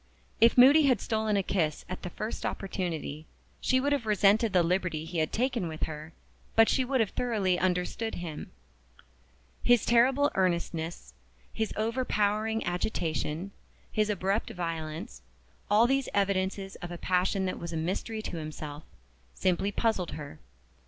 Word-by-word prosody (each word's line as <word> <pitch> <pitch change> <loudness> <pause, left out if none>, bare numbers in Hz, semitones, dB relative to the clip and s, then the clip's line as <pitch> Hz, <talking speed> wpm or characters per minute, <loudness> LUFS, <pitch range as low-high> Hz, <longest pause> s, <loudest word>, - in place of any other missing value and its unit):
If 230 +2 +5
Moody 280 +4 +8
had 250 -6 +3
stolen 220 -1 0
a 195 - +1
kiss 160 -6 -1
at 185 - -6
the 180 - -5
first 215 +5 -5
opportunity, 165 -5 -4 0.3
she 260 - +2
would 285 +2 0
have 280 -6 0
resented 210 +1 +4
the 180 -2 +4
liberty 170 -2 0
he 165 0 -3
had 155 - 0
taken 245 -5 0
with 160 -1 -6
her; 155 0 -5 0.4
but 225 0 +7
she 260 - +2
would 260 +1 0
have 215 - 0
thoroughly 200 -7 0
understood 185 +5 -1
him. 165 -4 -6 1.1
His 245 -2 +4
terrible 265 +5 +4
earnestness, 170 - -1 0.4
his 220 -1 -2
overpowering 220 -1 0
agitation, 175 -1 -2 0.4
his 215 0 +1
abrupt 200 +1 0
violence 160 - -5 0.5
all 210 +3 +5
these 270 +1 +1
evidences 195 -1 0
of 175 - -7
a 175 - -6
passion 185 +2 +1
that 185 - -3
was 170 0 -6
a 165 - -3
mystery 195 +6 -3
to 175 - -5
himself 155 -1 -6 0.5
simply 185 +2 +1
puzzled 205 -5 0
her. 145 -2 -8
195 Hz, 150 wpm, -29 LUFS, 170-225 Hz, 1.1 s, Moody